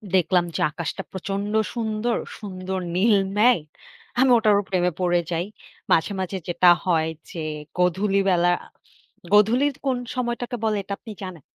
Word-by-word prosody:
দেখলাম 180 0 +3
যে - - -1
আকাশটা 170 +4 -4
প্রচন্ড 195 +2 -3 0.2
সুন্দর। 225 0 -1 0.2
সুন্দর 190 -2 -5 0.2
নীল 205 +3 +4 0.2
মেঘ। 240 0 +5 0.6
আমি 260 +1 +5
ওটারও 210 -3 +3
প্রেমে 180 -1 +1
পড়ে 175 -1 +2
যাই। 170 +1 -1 0.5
মাঝে, 165 - +3
মাঝে 190 +1 -3
যেটা 175 +1 +4 0.2
হয়, 160 -3 +2 0.2
যে 165 - -5 0.4
গধূলি 190 +3 +2
বেলা 175 -1 +3 0.8
গধূলির 240 +7 +4
কোন 260 -2 +1 0.2
সময়টাকে 245 -1 -2
বলে 215 -1 +1
এটা 200 - -5
আপনি 220 - -10
জানেন? 185 -4 -7
195 Hz, 140 wpm, -23 LUFS, 180-220 Hz, 0.8 s, মেঘ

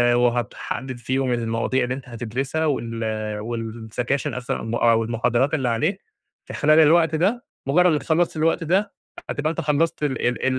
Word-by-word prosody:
وهتحدد 120 +1 -1
فيهم 130 +2 -1
المواضيع 115 +2 0
اللي 125 +1 -1
أنت 135 -1 -10
هتدرسها 125 +7 -2
وال 110 -5 -2
والسكاشن 115 +3 -3
أس 125 0 -5
آه 110 - -3 0.2
أو 115 0 +3
المحاضرات 120 +4 +1
اللي 135 -6 +1
عليك 155 - 0 0.5
في - - -8
خلال 155 +2 +4
الوقت 160 +1 +5
ده، 200 +9 0 0.2
مجرّد 175 +6 +4
إنّك 150 - -1
خلصت 165 0 +1
الوقت 165 +2 +1
ده 195 +5 +1 0.4
هتبقى 150 +1 -1
أنت 165 - -3
خلصت 150 +1 0
ال 135 -5 0
ال 125 - -1
130 Hz, 160 wpm, -23 LUFS, 115-155 Hz, 0.5 s, الوقت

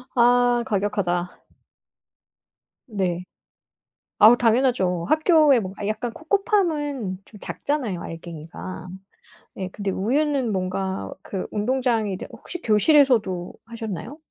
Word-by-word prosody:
아 245 0 +4
과격하다. 190 -4 -1 1.4
네. 185 -5 -2 1.0
아우 220 +3 +9
당연하죠. 225 -8 +2
학교에 310 -4 +5
뭔가 195 0 -6
약간 225 +2 -2
코코팜은 310 - 0
좀 210 - -14
작잖아요 245 - -3
알갱이가. 165 +2 -8 0.7
네 190 -1 -5
근데 200 -2 -3
우유는 265 +4 0
뭔가 190 0 -2
그 190 -2 -5
운동장이 230 -1 0
이제 185 - -6
혹시 355 - -8
교실에서도 215 - +3
하셨나요? 230 - -6
220 Hz, 245 characters per minute, -23 LUFS, 185-265 Hz, 1.4 s, 아우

